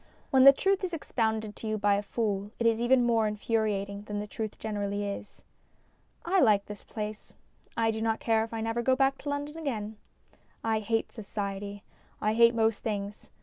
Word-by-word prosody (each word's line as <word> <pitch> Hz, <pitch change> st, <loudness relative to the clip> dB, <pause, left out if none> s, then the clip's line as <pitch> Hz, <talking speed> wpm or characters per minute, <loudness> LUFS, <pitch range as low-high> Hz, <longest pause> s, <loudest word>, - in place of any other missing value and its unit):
When 265 Hz, -1 st, +6 dB
the 275 Hz, -, +12 dB
truth 385 Hz, +7 st, +1 dB
is 355 Hz, -2 st, -1 dB
ex 310 Hz, -, -10 dB
pounded 220 Hz, -2 st, 0 dB
to 225 Hz, -, -6 dB
you 215 Hz, 0 st, 0 dB
by 205 Hz, -1 st, +3 dB
a 200 Hz, -, +1 dB
fool 205 Hz, -1 st, -2 dB
it 235 Hz, -, -2 dB
is 230 Hz, 0 st, +3 dB
even 245 Hz, +1 st, +4 dB
more 230 Hz, -2 st, +3 dB
infuriating 210 Hz, -2 st, -1 dB
than 205 Hz, 0 st, -4 dB
the 210 Hz, -, -3 dB
truth 215 Hz, 0 st, -5 dB
generally 205 Hz, -1 st, -2 dB
is. 200 Hz, 0 st, -7 dB, 0.8 s
I 375 Hz, +3 st, +3 dB
like 210 Hz, -, +4 dB
this 205 Hz, -1 st, -9 dB
place. 215 Hz, -1 st, -6 dB, 0.4 s
I 225 Hz, -1 st, +3 dB
do 220 Hz, 0 st, -4 dB
not 225 Hz, 0 st, 0 dB
care 225 Hz, -1 st, +2 dB
if 225 Hz, -, -7 dB
I 225 Hz, -1 st, -3 dB
never 225 Hz, +1 st, -1 dB
go 260 Hz, +2 st, +3 dB
back 270 Hz, 0 st, +2 dB
to 290 Hz, -, -5 dB
London 290 Hz, +2 st, -3 dB
again. 220 Hz, -8 st, -3 dB, 0.7 s
I 225 Hz, -1 st, +1 dB
hate 225 Hz, +1 st, -1 dB
Society; 200 Hz, -1 st, -5 dB, 0.4 s
I 215 Hz, +1 st, +1 dB
hate 235 Hz, +1 st, +5 dB
most 225 Hz, -2 st, +2 dB
things. 205 Hz, -1 st, -4 dB
220 Hz, 195 wpm, -29 LUFS, 205-235 Hz, 0.8 s, the